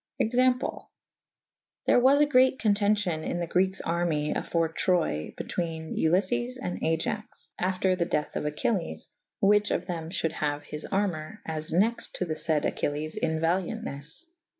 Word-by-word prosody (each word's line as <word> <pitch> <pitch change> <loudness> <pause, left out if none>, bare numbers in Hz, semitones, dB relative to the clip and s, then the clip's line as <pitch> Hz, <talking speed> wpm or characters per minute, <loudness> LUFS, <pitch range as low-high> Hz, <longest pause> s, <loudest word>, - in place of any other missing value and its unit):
Example. 250 +2 +1 1.0
There - - +5
was 270 +4 +5
a - - +7
great 260 -2 +4
contencion 205 -6 +1
in 175 - -2
the 170 - -1
Grekes 185 +3 +1
army 165 -3 0
afore 165 -1 0
Troye 165 - 0
betwcne 160 -2 -4
Uliffes 160 -8 +1
and 90 0 -4
Aiax 165 +7 -2
/ - - -22
after 185 0 +1
the 175 -2 0
dethe 150 - -1
of - - -1
Achelles 165 +5 -2 0.2
/ - - -62
whiche 205 +1 +4
of 175 - -1
them 165 -3 -4
fhulde 165 -3 -1
haue 145 -2 -2
his 150 0 -6
armour 195 -1 -2
as 155 -1 -3
nexte 210 +8 +1
to 180 - -1
the 160 - -2
fayd 155 -1 0
Achilles 150 +2 -2
in 160 -1 0
valiauntnes. 165 - -2
170 Hz, 155 wpm, -28 LUFS, 155-205 Hz, 1.0 s, a